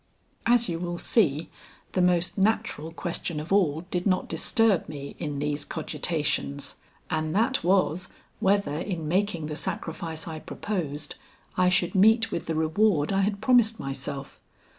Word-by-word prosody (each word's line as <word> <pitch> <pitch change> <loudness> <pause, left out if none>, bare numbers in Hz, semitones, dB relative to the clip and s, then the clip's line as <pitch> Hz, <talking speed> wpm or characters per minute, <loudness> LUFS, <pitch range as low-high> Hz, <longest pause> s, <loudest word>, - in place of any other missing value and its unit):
As 240 0 +4
you 165 -2 -2
will 175 0 -3
see, 165 - +1 0.4
the 185 - +1
most 180 -1 +2
natural 195 -6 0
question 165 -1 -3
of 155 +5 -3
all 160 -6 +3
did 180 +2 0
not 185 -1 +1
disturb 225 -10 +2
me 140 -2 -7
in 150 -3 -3
these 145 +1 -1
cogitations: 150 -3 -2 0.3
And 155 +1 -1
that 235 +3 +2
was, 185 -1 +2 0.3
whether 190 -6 +2
in 170 -4 -3
making 185 -1 0
the 150 0 -4
sacrifice 165 -2 -4
I 160 -1 -5
proposed, 155 -7 -4 0.4
I 180 0 +4
should 180 0 +2
meet 220 +3 +5
with 170 - -3
the 160 - -1
reward 160 +1 +2
I 195 - +3
had 200 +1 0
promised 230 -2 +4
myself. 135 +1 -5
175 Hz, 150 wpm, -27 LUFS, 155-200 Hz, 0.4 s, meet